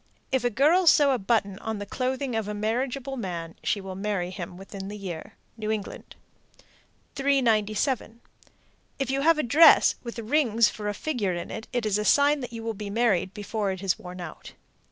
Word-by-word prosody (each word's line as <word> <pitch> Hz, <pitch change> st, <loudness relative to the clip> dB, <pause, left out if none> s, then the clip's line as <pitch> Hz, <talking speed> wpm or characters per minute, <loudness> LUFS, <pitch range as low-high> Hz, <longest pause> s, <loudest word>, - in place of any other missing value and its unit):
If 260 Hz, -2 st, +1 dB
a 245 Hz, -, +2 dB
girl 310 Hz, -, +3 dB
sew 290 Hz, -3 st, +6 dB
a 255 Hz, -, +1 dB
button 200 Hz, -2 st, 0 dB
on 220 Hz, -1 st, -4 dB
the 205 Hz, -, -5 dB
clothing 255 Hz, +3 st, -2 dB
of 220 Hz, -2 st, -1 dB
a 210 Hz, -, -4 dB
marriageable 255 Hz, +5 st, -2 dB
man, 170 Hz, -6 st, -5 dB
she 205 Hz, -, 0 dB
will 190 Hz, -1 st, -7 dB
marry 190 Hz, -2 st, -2 dB
him 180 Hz, -1 st, -7 dB
within 195 Hz, 0 st, -8 dB
the 210 Hz, +1 st, -6 dB
year. 180 Hz, -5 st, -7 dB, 0.2 s
New 215 Hz, -1 st, -4 dB
England. 215 Hz, -2 st, -5 dB, 1.0 s
397. 235 Hz, -3 st, +1 dB, 0.8 s
If 270 Hz, -2 st, -2 dB
you 270 Hz, 0 st, 0 dB
have 330 Hz, +2 st, +4 dB
a 305 Hz, -, 0 dB
dress 310 Hz, +8 st, +7 dB
with 235 Hz, 0 st, -7 dB
rings 230 Hz, -2 st, +2 dB
for 210 Hz, -1 st, -6 dB
a 205 Hz, -, -3 dB
figure 215 Hz, -, -2 dB
in 170 Hz, -, -6 dB
it, 220 Hz, -, -6 dB
it 245 Hz, -3 st, -1 dB
is 210 Hz, -1 st, +1 dB
a -, -, -1 dB
sign 285 Hz, +4 st, +4 dB
you 230 Hz, -1 st, -8 dB
will 225 Hz, 0 st, -2 dB
be 210 Hz, 0 st, -6 dB
married 200 Hz, -4 st, +1 dB
before 205 Hz, 0 st, -2 dB
it 190 Hz, 0 st, -4 dB
is 190 Hz, -3 st, 0 dB
worn 180 Hz, 0 st, -9 dB
out. 175 Hz, -3 st, -9 dB
220 Hz, 195 wpm, -26 LUFS, 200-260 Hz, 1.0 s, dress